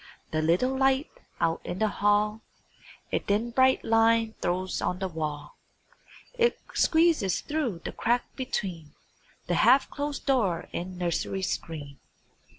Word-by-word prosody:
The 155 - 0
little 180 +12 +2
light 270 +1 +2 0.3
out 165 0 +1
in 175 - -5
the 220 - +2
hall 210 +1 +1 0.7
A - - +2
thin 215 +4 -1
bright 260 +2 +3
line 225 0 +3
throws 185 +1 -1
on 180 - -1
the 190 0 -2
wall; 155 -4 -5 0.8
It 475 0 +3 0.2
squeezes 320 - +3
thro' 295 - -2
the - - -6
crack 240 +2 +1
between 180 - -4 0.5
The 175 - -1
half 255 +4 +5
closed 290 0 -4
door 210 - +1
and 180 +1 -5
nursery 180 +2 -2
screen. 145 -6 -4
205 Hz, 135 wpm, -27 LUFS, 175-260 Hz, 0.8 s, half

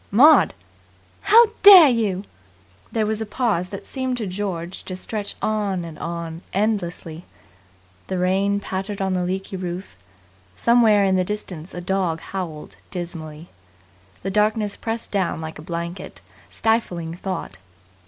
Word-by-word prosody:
"Maud!" 285 +10 +6 0.7
"How 460 0 +6
dare 385 -6 +11
you!" 210 -6 0 0.7
There 220 -1 0
was 220 +1 -1
a - - -2
pause 205 -6 0
that 195 - -8
seemed 260 -2 -3
to 225 - -3
George 185 -2 -4
to 185 - -5
stretch 205 +2 -3
on 200 -5 -1
and 165 -2 -9
on 170 -1 -5
endlessly. 180 -5 -2 0.8
The 185 - -2
rain 195 +3 +1
pattered 195 +1 -4
on 190 -1 0
the 180 -1 0
leaky 190 +1 -3
roof. 180 - -6 0.6
Somewhere 225 -4 +4
in 190 -1 +2
the 185 - +2
distance 185 -4 -6
a 175 - -5
dog 180 -3 -1
howled 165 -6 -6
dismally. 165 -3 -7 0.7
The 195 - -2
darkness 210 0 +1
pressed 225 0 -4
down 190 -5 0
like 160 -1 -7
a - - -8
blanket, 170 +1 -6 0.3
stifling 180 -8 -1
thought. 175 - -5
190 Hz, 140 wpm, -22 LUFS, 175-215 Hz, 0.8 s, dare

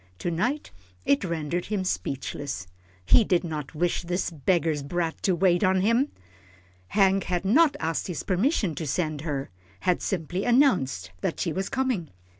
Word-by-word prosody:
To 175 - -2
night 245 - -1 0.3
it 140 - +3
rendered 170 0 -2
him 205 -3 -1
speechless. 135 - -3 0.4
He 225 - +6
did 180 -3 +2
not 155 -3 -5
wish 175 +3 0
this 180 +1 -2
beggar's 160 0 +1
brat 165 +3 -2
to 185 - +2
wait 175 +2 +3
on 185 0 +3
him. 230 +8 +2 0.8
Hank 195 - +3
had 180 +1 -1
not 285 +9 +5
asked 160 +1 -1
his 175 -4 -4
permission 195 - +1
to 155 +1 -4
send 155 0 -1
her 145 - -3 0.3
had 180 - +1
simply 180 0 -2
announced 180 - +2
that - - -2
she 170 - -1
was 190 +3 -2
coming. 250 - -1
175 Hz, 160 wpm, -26 LUFS, 155-195 Hz, 0.8 s, He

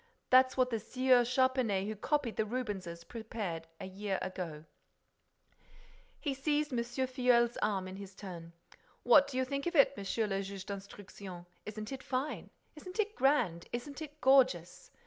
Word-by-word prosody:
That's 255 +1 +6
what 255 -1 +3
the 225 - 0
Sieur 255 +2 +3
Charpenais 250 -5 +2
who 215 +1 -3
copied 250 +1 -1
the - - +1
Rubenses, 205 -8 -4
prepared 205 -6 -5
a - - -5
year 190 +1 -3
ago." 165 -5 -5 1.5
He 290 -4 -1
seized 295 +1 0
M. 240 - +1
Filleul's 245 -1 +2
arm 195 -3 0
in 185 +1 -7
his 195 -1 -9
turn. 170 -5 -8 0.5
"What 275 +3 +7
do 270 -2 -5
you 260 - +2
think 280 +4 -3
of 345 - -2
it, 280 -1 +6
Monsieur 200 +2 -1
le 195 -1 -1
Juge 195 -1 -6
d'Instruction? 195 -2 -8 0.2
Isn't 215 +2 -6
it 265 -1 -5
fine? 260 +4 -3 0.3
Isn't 365 +7 -9
it 425 0 +1
grand? 245 - +2
Isn't 275 +5 -5
it 300 -1 -8
gorgeous? 255 -10 +3
235 Hz, 160 wpm, -33 LUFS, 195-260 Hz, 1.5 s, What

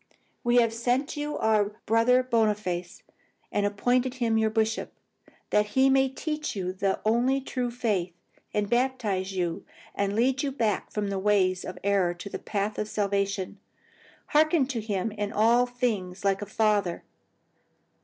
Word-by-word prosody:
"'We 240 0 +2
have 230 -2 +4
sent 245 +3 +1
unto 295 - -6
you 295 0 -3
our 210 -2 +2
Brother 230 +3 +4
Boniface, 210 -7 -1 0.5
and 205 0 +1
appointed 245 +5 +1
him 235 -3 0
your 220 0 +3
bishop, 220 +1 -1 0.6
that 210 0 +3
he 265 +1 +5
may 270 0 +4
teach 300 +2 -4
you 185 -2 -3
the 190 0 -1
only 245 +5 +2
true 255 -2 -3
faith, 210 -7 -1 0.4
and 210 -1 0
baptize 225 -6 0
you, 175 -3 -2 0.3
and 200 0 -1
lead 260 +4 +2
you 280 - -1
back 225 -7 -1
from 210 -1 -2
the 195 - -1
ways 190 -2 +2
of 185 - -7
error 195 -3 +2
to 175 +3 -8
the - - -4
path 205 0 -2
of 210 - -1
salvation. 200 -2 -1 0.7
Hearken 310 -2 +4
to 240 -5 -2
him 210 0 -2
in 205 -1 -3
all 235 +3 +4
things 210 -7 -2
like 195 0 +2
a 205 - -5
father. 210 -4 +1
215 Hz, 160 wpm, -27 LUFS, 200-245 Hz, 0.7 s, he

